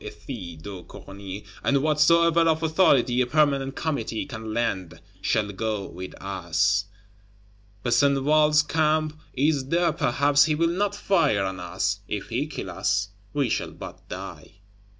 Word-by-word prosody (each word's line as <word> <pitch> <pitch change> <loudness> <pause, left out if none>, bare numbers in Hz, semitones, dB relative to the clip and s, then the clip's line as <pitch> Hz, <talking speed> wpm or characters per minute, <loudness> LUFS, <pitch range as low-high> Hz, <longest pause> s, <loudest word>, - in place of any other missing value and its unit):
Ethys 90 - -8
de 95 -1 -7
Corny, 100 +2 -9 0.2
and 140 0 +2
whatsoever 165 +2 +4
of 165 -1 +2
authority 140 -7 +3
a 125 - +1
Permanent 140 -2 +1
Committee 140 -7 -2
can 110 -5 -7
lend, 95 -8 -2 0.2
shall 105 +1 0
go 105 0 -3
with 90 +2 -8
us. 95 +1 0 1.0
Besenval's 145 +4 +3
Camp 155 0 +1 0.2
is 140 0 +1
there; 170 +1 +2
perhaps 140 +3 +3
he 155 -1 +1
will 165 +2 +2
not 205 +1 0
fire 150 - +2
on 95 -1 -4
us; 95 +3 -2
if 105 -2 -4
he 125 +6 -1
kill - - -6
us, 100 +2 0 0.2
we 145 -3 +1
shall - - -1
but - - -11
die. - - -8
130 Hz, 140 wpm, -25 LUFS, 100-155 Hz, 1.0 s, whatsoever